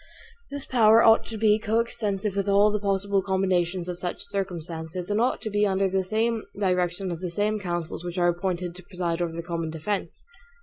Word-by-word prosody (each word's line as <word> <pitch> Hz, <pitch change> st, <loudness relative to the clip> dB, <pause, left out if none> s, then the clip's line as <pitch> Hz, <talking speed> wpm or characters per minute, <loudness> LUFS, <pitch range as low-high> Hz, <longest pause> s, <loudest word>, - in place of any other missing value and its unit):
This 285 Hz, -1 st, -5 dB
power 230 Hz, -2 st, +5 dB
ought 225 Hz, 0 st, +5 dB
to 225 Hz, -, -5 dB
be 215 Hz, 0 st, +4 dB
coextensive 215 Hz, -3 st, -1 dB
with 200 Hz, 0 st, 0 dB
all 200 Hz, +1 st, +5 dB
the 210 Hz, -, 0 dB
possible 200 Hz, 0 st, +1 dB
combinations 185 Hz, -2 st, 0 dB
of 180 Hz, -1 st, -4 dB
such 180 Hz, -1 st, -4 dB
circumstances; 175 Hz, -2 st, -4 dB
and 210 Hz, +2 st, +2 dB
ought 250 Hz, -, +1 dB
to 215 Hz, -, -3 dB
be 205 Hz, +1 st, +2 dB
under 195 Hz, 0 st, +1 dB
the 215 Hz, +5 st, 0 dB, 0.2 s
direction 180 Hz, -1 st, 0 dB
of 170 Hz, -, -4 dB
the 180 Hz, -, -3 dB
same 210 Hz, +4 st, 0 dB
councils 175 Hz, -3 st, -4 dB
which 175 Hz, +1 st, -5 dB
are 175 Hz, -1 st, +3 dB
appointed 175 Hz, 0 st, -2 dB
to 180 Hz, -, -10 dB
preside 175 Hz, -2 st, -3 dB
over 170 Hz, -1 st, -1 dB
the 170 Hz, -, -4 dB
common 165 Hz, -1 st, -3 dB
defense. 165 Hz, +6 st, -4 dB
190 Hz, 190 wpm, -26 LUFS, 175-210 Hz, 0.2 s, power